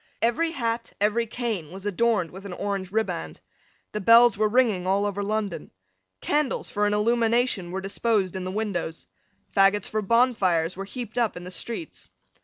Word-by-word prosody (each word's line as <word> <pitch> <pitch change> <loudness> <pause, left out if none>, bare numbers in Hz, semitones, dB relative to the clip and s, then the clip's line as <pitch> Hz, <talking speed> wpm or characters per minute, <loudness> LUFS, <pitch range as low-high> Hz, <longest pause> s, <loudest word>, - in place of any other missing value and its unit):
Every 240 +9 +1
hat, 230 -6 -3
every 215 +3 +1
cane, 220 -9 -3
was 190 +2 -9
adorned 205 -3 +1
with 190 +2 -10
an 185 - -7
orange 195 -1 -3
riband. 220 +1 -2 0.5
The 210 - -3
bells 230 +3 +7
were 215 +1 +1
ringing 215 -6 +2
all 200 +2 +2
over 205 0 -2
London. 205 -2 -2 0.5
Candles 295 -3 -1
for 210 0 +1
an 205 - +1
illumination 230 -3 +1
were 190 +2 -4
disposed 195 -1 0
in 190 - -3
the 185 - -4
windows. 185 -5 -3 0.5
Faggots 195 +1 +4
for 215 - -1
bonfires 205 -7 +2
were 195 +1 -5
heaped 240 +2 -5
up 230 -6 0
in 175 - -8
the 180 - -8
streets. 235 - -6
210 Hz, 170 wpm, -25 LUFS, 190-235 Hz, 0.5 s, bells